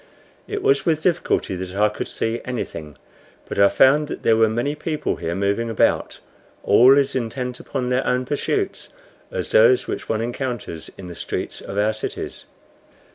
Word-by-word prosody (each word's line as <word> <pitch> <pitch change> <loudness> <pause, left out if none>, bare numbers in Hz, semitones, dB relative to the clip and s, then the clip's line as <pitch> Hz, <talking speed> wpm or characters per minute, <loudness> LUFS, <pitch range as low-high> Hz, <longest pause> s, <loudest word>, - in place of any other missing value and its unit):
It 415 -2 -4
was 415 -1 +3
with 155 -2 0
difficulty 170 - 0
that 90 +1 -6
I 105 +1 +4
could 105 - -5
see 115 +1 -2
anything, 80 - -5 0.5
but - - -4
I 100 0 +7
found 145 +3 +4
that - - -7
there 115 - +4
were 110 0 +4
many 120 +6 -1
people 155 0 -3
here 85 0 -3
moving 100 +4 0
about, 115 - +1 0.4
all 125 +7 +6
as 140 -1 +2
intent 125 0 -3
upon 125 -3 -3
their 125 +1 0
own 125 0 +1
pursuits 385 - -2 0.4
as - - -4
those 475 -6 +5
which 395 +1 -5
one 110 0 0
encounters 120 - -4
in 95 - -9
the 90 - -7
streets - - -5
of 100 - -7
our 105 +1 +2
cities. 110 - -6
125 Hz, 175 wpm, -22 LUFS, 105-145 Hz, 0.5 s, I